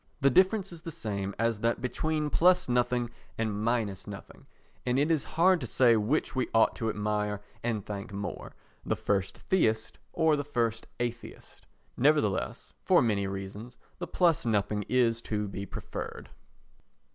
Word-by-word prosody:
The 140 0 +4
difference 190 - +3
is 170 -2 -10
the 165 - -6
same 100 -10 -4
as 115 -1 0
that 115 +1 +1
between 150 +3 -1
plus 180 +1 +4
nothing 125 -1 +1 0.3
and 110 -2 -1
minus 110 -5 -1
nothing, 100 -1 -10 0.4
and 125 +1 +1
it 145 +4 +2
is 155 -4 +2
hard 180 +1 +3
to 125 - -3
say 120 0 +5
which 115 +8 0
we 130 - 0
ought 115 - +4
to 115 - -1
admire 105 -1 -1 0.2
and 115 -4 -1
thank 100 -1 -6
most—the 100 0 -6
first 95 -1 -1
theist 110 -12 0
or 160 -2 +3
the 145 - -2
first 115 -5 -1
atheist. 120 -1 -6 0.3
Nevertheless, 135 -8 +1
for - - +5
many 100 -4 +1
reasons, 100 +5 -7 0.2
the - - -4
plus 170 -4 +2
nothing 105 -2 0
is 120 -2 +2
to 105 -2 -2
be 100 0 -6
preferred. - - -7
115 Hz, 155 wpm, -29 LUFS, 105-145 Hz, 0.4 s, say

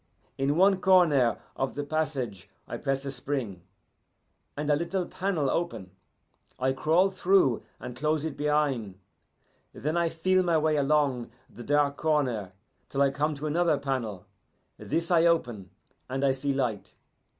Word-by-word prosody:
In 140 +3 0
one 190 +1 +4
corner 165 -11 +4 0.2
of 135 - -2
the 145 - -2
passage 140 -10 -3 0.2
I - - -5
press 135 0 -2
a 135 - -3
spring, 130 -8 -4 1.0
and 145 0 -3
a 150 - +4
little 170 +4 -2
panel 180 -7 -1
open. 150 - -2 0.7
I 130 +1 +1
crawl 165 +8 +2
through 185 -9 +3 0.2
and 125 - -7
close 150 +3 0
it 160 - -4
behin'. 145 -9 0 0.8
Then 155 +4 -2
I 170 -1 +2
feel 185 +3 +2
my 170 -3 +2
way 155 0 +2
along 140 -4 +1 0.2
the 120 - -11
dark 145 +1 +1
corner 125 - 0 0.4
till 140 0 +1
I 140 - +3
come 150 +2 -1
to 145 +2 -6
another 160 0 +2
panel. 130 -9 -3 0.5
This 165 +4 -2
I 170 -1 +5
open, 120 - 0 0.4
and 135 +1 -2
I 135 - +4
see 135 +2 -1
light. 125 -7 -2
145 Hz, 150 wpm, -28 LUFS, 130-165 Hz, 1.0 s, I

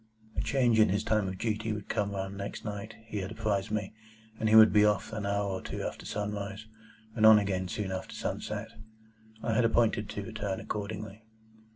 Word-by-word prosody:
A - - 0
change 120 -5 +2
in 110 - +6
his 100 +3 +1
time 110 -3 +1
of 95 0 -4
duty 110 +1 -1
would 105 -2 -6
come 100 -1 -1
round 95 0 -4
next 100 +2 -6
night, 105 +1 -5
he 110 - -5
had 95 0 -4
apprised 105 -3 -1
me, 105 -2 -2 0.5
and 110 - +1
he 110 - +5
would 110 -1 +9
be 105 -1 +6
off 105 +1 +1
an 105 -2 -3
hour 100 0 0
or 95 -1 -3
two - - -5
after - - -5
sunrise, 105 0 -4 0.5
and 110 - 0
on 110 0 +10
again 95 -3 0
soon 95 +1 -3
after 95 0 -5
sunset. - - -4 0.7
I 115 - 0
had 125 - +3
appointed 115 -2 +2
to 105 - -4
return 105 -4 -3
accordingly. 105 0 -5
105 Hz, 200 wpm, -30 LUFS, 100-110 Hz, 0.7 s, on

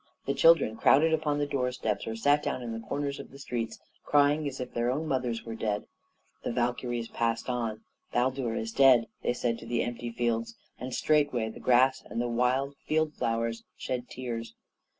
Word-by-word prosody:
The 140 - 0
children 160 -10 +5
crowded 160 +7 +5
upon 155 -2 +1
the 145 - +1
doorsteps, 125 -6 -2
or 110 - -3
sat 145 +6 +3
down 130 - -2
at 120 - -4
the 115 0 -6
corners 140 0 -2
of - - -8
the 135 - -13
streets, 115 -5 -4 0.3
crying 145 +1 +3
as 135 -1 -5
if 125 -1 -5
their 120 +1 0
own 145 +5 -1
mothers 125 -5 -1
were 115 - -5
dead. 105 -2 -2 0.6
The - - -1
Valkyries 120 -1 -1
passed 115 -1 -1
on. 115 -3 -2 0.3
"Baldur 125 -1 0
is 115 0 -3
dead!" 130 -2 +6 0.2
they - - +1
said 120 -1 -1
to 115 - -10
the 120 0 +1
empty 120 0 -4
fields; 115 -1 -1 0.2
and 130 +1 -5
straightway 145 -5 +2
the 110 - -10
grass 130 +1 +4
and 115 - -5
the 120 - 0
wild 125 +4 +1
field 155 0 +1
flowers 115 -1 -1 0.2
shed 125 -1 -4
tears. 115 -3 -5
125 Hz, 190 wpm, -29 LUFS, 115-140 Hz, 0.6 s, dead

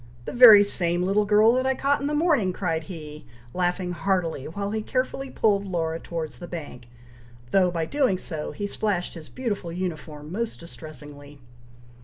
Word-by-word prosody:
the - - -5
very 225 -5 +10
same 175 -3 0
little 200 +3 +2
girl 210 +2 +5
that 255 +1 +1
I 265 - +1
caught 280 +2 +1
in 280 - -1
the 300 - -1
morning," 295 - +2
cried 165 -4 -2
he, 150 -3 -9 0.3
laughing 180 0 -1
heartily, 175 -6 -1
while 200 +5 -4
he 220 0 -2
carefully 260 +3 -2
pulled 205 -5 +1
Laura 165 -4 -2
towards 160 -8 -6
the 175 - -8
bank, 145 -8 -8 0.6
though, 185 -2 +4
by 165 -2 -2
doing 255 - +1
so, 160 -4 -5
he 205 - -5
splashed 200 -3 -2
his 165 -3 -11
beautiful 210 -9 -4
uniform 160 -4 -5
most 225 +4 -3
distressingly. 145 -1 -10
180 Hz, 170 wpm, -25 LUFS, 160-215 Hz, 0.6 s, very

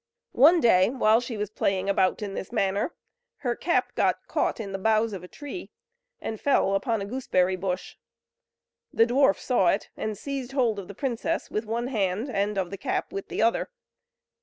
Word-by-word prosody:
One 320 +7 +6
day, 190 - +5
when 225 -3 +3
she 240 -2 -5
was 210 0 -3
playing 195 -2 0
about 195 +1 +2
in 200 -1 -4
this 195 - -6
manner, 200 - 0 0.5
her 240 -1 +1
cap 345 - 0
got - - +1
caught - - -1
in 200 -3 -5
the 195 - -4
boughs 220 +2 +2
of 185 -2 -6
a - - -9
tree, 290 - -8 0.5
and 220 - -5
fell 265 -8 +3
upon 220 +1 0
a - - -4
gooseberry 195 -6 +1
bush. 185 0 -4 0.9
The 225 - +4
dwarf 245 -3 +3
saw 240 -8 +1
it, 195 +4 +1
and 215 -1 -4
seized 270 -2 -5
hold 235 -6 +1
of 190 - -8
the 200 - -9
princess 245 -2 -2
with 215 +2 -2
one 235 +2 -1
hand, 210 +2 -1
and 205 -1 -1
of 190 -2 -1
the 195 - -6
cap - - -2
with 195 - -5
the - - -1
other. 230 - +1
215 Hz, 190 wpm, -26 LUFS, 195-245 Hz, 0.9 s, One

